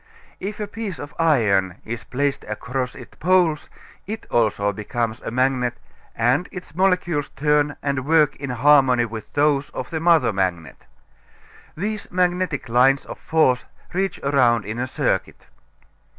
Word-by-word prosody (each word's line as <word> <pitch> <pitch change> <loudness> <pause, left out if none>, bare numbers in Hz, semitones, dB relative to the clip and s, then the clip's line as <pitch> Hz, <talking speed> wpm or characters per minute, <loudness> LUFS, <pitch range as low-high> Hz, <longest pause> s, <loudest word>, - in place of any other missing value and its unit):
If 205 +3 -5
a 210 - -2
piece 205 -4 -6
of 145 - -8
iron 105 - +2
is 115 -1 -5
placed 140 +2 -1
across 125 +4 -4
its 125 -3 -12
poles 175 -3 +2 0.4
it 220 +2 -5
also 105 -3 +1
becomes 115 +3 -3
a - - -5
magnet 125 0 +1 0.4
and 125 +9 +1
its 185 -4 -9
molecules 175 -5 +1
turn 150 0 +1
and 140 -2 -1
work 155 0 +3
in 135 -1 -5
harmony 130 -1 +4
with 110 -1 -8
those 145 -1 +2
of 130 - -5
the 160 - -2
mother 165 -8 +4
magnet. 90 -4 -3 0.9
These 210 +4 -3
magnetic 180 -4 0
lines 130 +3 +3
of - - -9
force 130 -7 +2 0.3
reach 190 0 -1
around 125 -6 +3
in 110 +3 -5
a 130 - -1
circuit. - - -2
140 Hz, 145 wpm, -22 LUFS, 120-165 Hz, 0.9 s, harmony